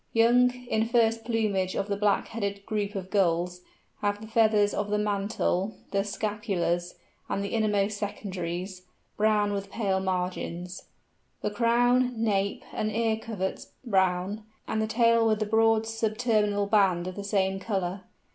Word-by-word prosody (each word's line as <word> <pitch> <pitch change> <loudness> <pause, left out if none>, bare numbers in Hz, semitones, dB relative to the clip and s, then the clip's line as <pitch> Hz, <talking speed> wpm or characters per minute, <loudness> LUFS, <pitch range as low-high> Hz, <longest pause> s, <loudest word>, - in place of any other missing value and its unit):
Young, 240 +2 +5 0.2
in 220 -2 0
first 225 -2 +2
plumage 210 -5 0
of 200 - -1
the 200 - -1
Black 205 0 +1
headed 200 -3 -4
group 205 -1 -2
of 190 -1 -5
Gulls, 180 -2 +1 0.4
have 205 0 0
the 220 - -9
feathers 215 -2 +3
of 205 0 -2
the 210 - +1
mantle, 205 -1 -1 0.2
the 195 0 +1
scapulars, 200 -4 -2 0.3
and 200 - -1
the 200 - -3
innermost 210 -2 0
secondaries, 185 -2 -4 0.3
brown 210 -1 +2
with 200 0 -4
pale 195 -3 0
margins; 180 -1 -3 0.6
the 210 - 0
crown, 245 +3 +3
nape, 200 -3 0
and 215 0 -1
ear 225 0 +1
coverts 215 -4 -5
brown; 190 -1 +1 0.3
and 220 - -1
the 220 - 0
tail 230 0 +3
with 215 -1 +2
a - - -3
broad 225 +1 +3
sub 225 -1 -2
terminal 210 -4 +2
band 195 -4 +3
of 185 - -4
the 200 - -5
same 195 -1 0
colour. 190 -2 -2
205 Hz, 155 wpm, -27 LUFS, 195-220 Hz, 0.6 s, Young